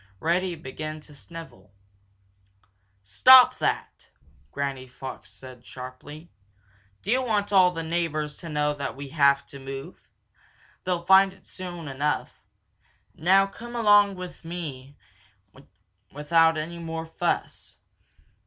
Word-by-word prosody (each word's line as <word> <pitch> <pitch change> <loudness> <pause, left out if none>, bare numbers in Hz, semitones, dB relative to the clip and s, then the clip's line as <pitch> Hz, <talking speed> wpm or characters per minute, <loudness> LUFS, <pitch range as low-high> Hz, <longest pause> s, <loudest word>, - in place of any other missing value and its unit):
Reddy 175 - 0
began 155 +1 -7
to 150 - -16
snivel. 160 - -12 1.3
"Stop 255 - +7
that!" - - -1
said - - -26 0.4
Granny 140 -2 -4
Fox 130 +1 -10 0.2
sharply. 130 +6 -11 0.7
"Do 200 - -2
you 255 +2 +3
want 210 -5 -1
all 185 -2 +6
the 165 -2 -5
neighbors 160 -3 -2
to 170 - -9
know 150 -1 0
that 140 -2 -5
we 140 0 -8
have 140 -2 +4
got 140 - -32
to 140 - -10
move? 135 0 -9 0.8
They'll 175 -2 -2
find 190 +1 +6
it - - -19
out - - -32
soon 175 -3 -8
enough. 140 +2 -3 0.7
Now 190 +4 +4
come 235 +5 -10
along 205 -3 +5
without 130 - -10 0.9
any 165 +3 -5
more 165 -1 -5
fuss. 165 - -3
160 Hz, 120 wpm, -25 LUFS, 140-180 Hz, 1.3 s, Stop